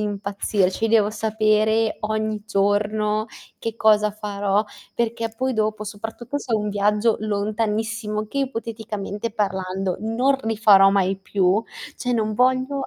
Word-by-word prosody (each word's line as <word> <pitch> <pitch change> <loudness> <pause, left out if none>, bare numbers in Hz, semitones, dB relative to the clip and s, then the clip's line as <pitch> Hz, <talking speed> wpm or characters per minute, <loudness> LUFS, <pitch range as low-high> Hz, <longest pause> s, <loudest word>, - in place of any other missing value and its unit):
impazzirci, 200 0 -1
devo 215 -2 +4
sapere 220 0 +1
ogni 215 0 -2
giorno 210 +1 +1 0.3
che 225 0 -4
cosa 215 -1 +4
farò, 205 0 -1 0.3
perché 230 -1 -2
poi 260 +1 0
dopo, 215 -1 -1
soprattutto 225 +6 -5
se 250 -4 -6
è - - +4
un 210 0 -2
viaggio 210 +2 +2
lontanissimo, 215 +1 -2
che 275 - -4
ipoteticamente 225 -4 -4
parlando 190 -3 -2
non 245 +6 +1
rifarò 215 -4 +5
mai 195 -1 +1
più, 195 +2 +1 0.3
cioè, 250 -1 -2
non 215 -1 0
voglio 260 +3 +1
215 Hz, 125 wpm, -22 LUFS, 205-225 Hz, 0.3 s, rifarò